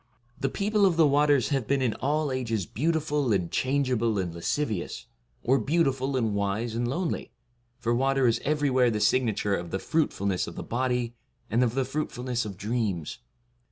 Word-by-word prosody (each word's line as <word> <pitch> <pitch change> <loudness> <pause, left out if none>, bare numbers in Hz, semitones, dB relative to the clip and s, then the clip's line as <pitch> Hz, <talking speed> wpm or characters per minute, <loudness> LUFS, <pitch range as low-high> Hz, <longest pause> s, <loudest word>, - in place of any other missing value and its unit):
The 135 - 0
people 205 +6 +1
of 170 -3 0
the 165 - +6
waters 145 -2 +3
have 135 -6 0
been 140 0 +2
in 125 -4 +1
all 150 +1 0
ages 115 -6 -1
71 - - -14
beautiful 150 -3 +1
and 90 -4 0
changeable 130 -5 +1
and 90 -3 -2
lascivious, 100 - -2 0.4
or 135 +3 +3
beautiful 135 -4 +1
and 115 -4 0
wise 100 +3 -1
and 120 +1 -1
lonely, 170 +7 -2 0.5
for 120 -2 0
water 135 +2 +2
is 115 -1 +2
everywhere 140 -4 +2
the 110 -2 -1
signature 105 -2 +2
of 85 -2 -5
the 95 - -1
fruitfulness 100 - 0
of - - -8
the - - -5
body 125 -1 -1 0.4
and 120 +3 +3
of 120 -1 0
the 135 -1 +1
fruitfulness 125 -4 -2
of 100 -3 -6
dreams. 100 -7 -2
125 Hz, 175 wpm, -27 LUFS, 110-140 Hz, 0.5 s, the